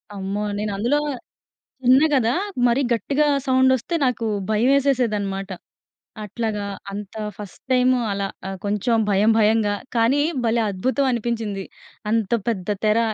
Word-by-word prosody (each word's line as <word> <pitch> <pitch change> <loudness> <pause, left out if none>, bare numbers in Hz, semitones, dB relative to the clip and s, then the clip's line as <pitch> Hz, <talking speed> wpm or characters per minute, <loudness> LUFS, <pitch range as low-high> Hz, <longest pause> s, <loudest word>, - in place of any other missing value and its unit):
అమ్మో! 200 +2 -3
నేనందులో 215 +7 0 0.8
చిన్న 260 +4 +6
కదా! 240 -2 +2 0.3
మరీ 240 +4 +2
గట్టిగా 280 +7 +1 0.2
సౌండొస్తే, 260 +4 +2
నాకు 240 -2 -1 0.2
భయవేసేసేదనమాట. 220 -5 +1 0.7
అట్లాగా, 210 0 -3 0.3
అంత 205 +1 -7 0.2
ఫస్ట్ 205 -2 -10
టైము 255 0 +4
అలా 200 0 -2 0.2
ఆహ్, 195 - -4
కొంచెం 210 +3 0
భయం 205 +3 +4
భయంగా. 215 -1 +3 0.2
కానీ, 235 +5 +3 0.2
భలే 230 0 +2
అద్భుతం 260 +8 0
అనిపించింది, 225 -4 -2 0.5
అంత 225 -3 0 0.2
పెద్ద 195 -5 -2 0.2
తెర. 215 +2 +3
225 Hz, 115 wpm, -22 LUFS, 205-255 Hz, 0.8 s, చిన్న